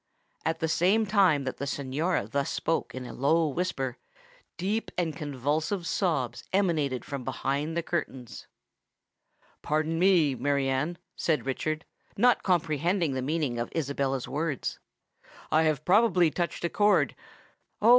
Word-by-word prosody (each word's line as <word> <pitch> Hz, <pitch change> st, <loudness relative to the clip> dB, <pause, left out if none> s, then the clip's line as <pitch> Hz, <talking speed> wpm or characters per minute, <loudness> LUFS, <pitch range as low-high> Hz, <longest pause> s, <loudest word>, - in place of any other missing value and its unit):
At 160 Hz, 0 st, -1 dB
the 160 Hz, -, +1 dB
same 190 Hz, +7 st, +3 dB
time 190 Hz, -8 st, +4 dB
that 130 Hz, -, -4 dB
the 140 Hz, -, -4 dB
Signora 140 Hz, -, -1 dB
thus 140 Hz, +4 st, -1 dB
spoke 165 Hz, -, -1 dB
in 130 Hz, -1 st, -5 dB
a 120 Hz, -, -7 dB
low 160 Hz, +5 st, +2 dB
whisper, 135 Hz, -5 st, -2 dB, 0.6 s
deep 205 Hz, +5 st, -1 dB
and 165 Hz, -4 st, 0 dB
convulsive 150 Hz, +6 st, -2 dB
sobs 145 Hz, -, -1 dB
emanated 160 Hz, -10 st, +1 dB
from 140 Hz, -2 st, -5 dB
behind 140 Hz, +5 st, -2 dB
the 170 Hz, -, 0 dB
curtains. 135 Hz, -8 st, -4 dB, 1.1 s
"Pardon 155 Hz, +2 st, 0 dB
me, 175 Hz, -6 st, +4 dB
Mary 140 Hz, +2 st, 0 dB
Anne," 140 Hz, +6 st, -1 dB, 0.2 s
said 155 Hz, -5 st, 0 dB
Richard, 155 Hz, +4 st, -2 dB, 0.3 s
not 245 Hz, +4 st, +4 dB
comprehending 170 Hz, -1 st, +1 dB
the 130 Hz, -, -2 dB
meaning 140 Hz, -3 st, -1 dB
of 120 Hz, -, -2 dB
Isabella's 140 Hz, -4 st, -1 dB
words; 150 Hz, -2 st, -2 dB, 0.7 s
"I 160 Hz, +1 st, +4 dB
have 155 Hz, -1 st, 0 dB
probably 185 Hz, -4 st, +4 dB
touched 175 Hz, +1 st, -3 dB
a -, -, +1 dB
chord——" 205 Hz, 0 st, +3 dB, 0.7 s
"Oh! 220 Hz, -, +4 dB
155 Hz, 140 wpm, -28 LUFS, 135-175 Hz, 1.1 s, time